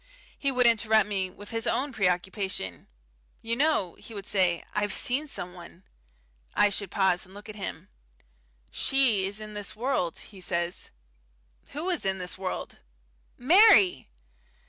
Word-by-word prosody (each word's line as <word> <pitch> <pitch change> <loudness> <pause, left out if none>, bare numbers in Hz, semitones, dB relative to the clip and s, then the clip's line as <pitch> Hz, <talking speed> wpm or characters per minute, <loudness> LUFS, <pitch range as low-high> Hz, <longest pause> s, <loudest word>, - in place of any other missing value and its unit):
He 275 - -1
would 250 -1 +2
interrupt 220 -1 +4
me 195 -3 -1
with 205 +3 -12
his 225 0 -1
own 275 +1 0
preoccupation. 190 - -2 0.6
"You 230 +1 0
know," 270 - +1
he 225 - -10
would 200 -1 -6
say, 180 -4 +1
"I've 205 -1 0
seen 265 +9 -1
someone." 180 -6 -6 0.7
I 205 - +5
should 200 -1 -2
pause 190 -2 +2
and 190 +1 -13
look 205 +1 -11
at 215 - -8
him. 200 - -6 0.8
"She 240 -8 +2
is 200 +2 -3
in 215 0 -8
this 205 0 -6
world," 225 -8 -1
he 195 -3 -11
says. 170 -1 -1 0.8
"Who 325 +6 -1
is 345 - 0
in 190 0 0
this 180 -1 -4
world?" 185 -1 -5 0.6
"Mary!" 250 - +6
205 Hz, 145 wpm, -27 LUFS, 185-235 Hz, 0.8 s, Mary